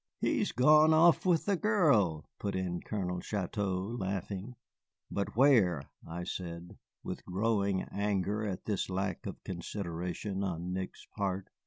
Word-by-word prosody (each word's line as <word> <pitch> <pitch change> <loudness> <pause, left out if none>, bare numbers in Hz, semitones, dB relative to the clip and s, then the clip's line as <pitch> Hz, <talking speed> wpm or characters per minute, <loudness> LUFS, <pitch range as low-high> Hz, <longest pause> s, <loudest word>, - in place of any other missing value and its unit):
"He - - +1
has - - 0
gone 155 +5 +6
off 170 +3 +5
with 170 -3 +3
the 200 - +2
girl," 140 - +3
put 100 - -2
in 90 -2 -2
Colonel 90 -4 -3
Chouteau, 100 +1 -2
laughing. 100 +4 -3 0.6
"But 100 0 -2
where?" 110 - +5 0.2
I 85 +2 -5
said, 85 +1 -6 0.3
with - - -5
growing 100 0 0
anger 100 +1 -1
at 100 -4 -4
this 100 -4 -1
lack 95 +1 -2
of - - -7
consideration 90 +1 -4
on 90 -1 -3
Nick's 95 0 -5
part. 95 -2 -2
100 Hz, 140 wpm, -32 LUFS, 90-110 Hz, 0.6 s, gone